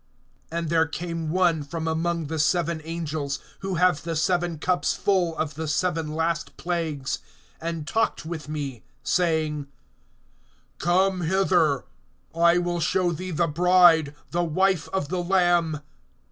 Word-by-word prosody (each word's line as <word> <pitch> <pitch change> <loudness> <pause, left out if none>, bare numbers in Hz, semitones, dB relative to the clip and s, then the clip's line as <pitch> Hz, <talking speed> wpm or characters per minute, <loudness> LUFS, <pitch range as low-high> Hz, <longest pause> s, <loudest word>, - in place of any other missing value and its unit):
(9)And 165 -1 -2
there 165 -1 +3
came 165 0 -4
one 170 -2 +2
from 160 +3 -4
among 165 +1 -1
the 160 +2 -3
seven 170 +1 +1
angels, 155 -3 -3 0.2
who 195 -1 -3
have 180 -3 +3
the 165 +1 -3
seven 175 +1 +1
cups 180 +3 0
full 180 -5 +1
of 155 -1 -2
the 160 +2 -4
seven 160 -1 -1
last 165 +1 -1
plagues, 160 -6 -2 0.4
and 165 -2 -4
talked 225 -3 0
with 160 -2 -6
me, 140 -6 -4 0.2
saying: 155 -4 0 1.1
Come 185 +2 +2
hither; 170 -5 +2 0.5
I 170 +1 +4
will 175 0 0
show 175 +1 +1
thee 185 +3 -5
the 170 0 +1
bride, 170 -2 +5 0.2
the 175 +1 +1
wife 185 +1 +1
of 190 -7 -2
the 180 0 -1
Lamb. 175 -4 +2
165 Hz, 140 wpm, -25 LUFS, 155-175 Hz, 1.1 s, bride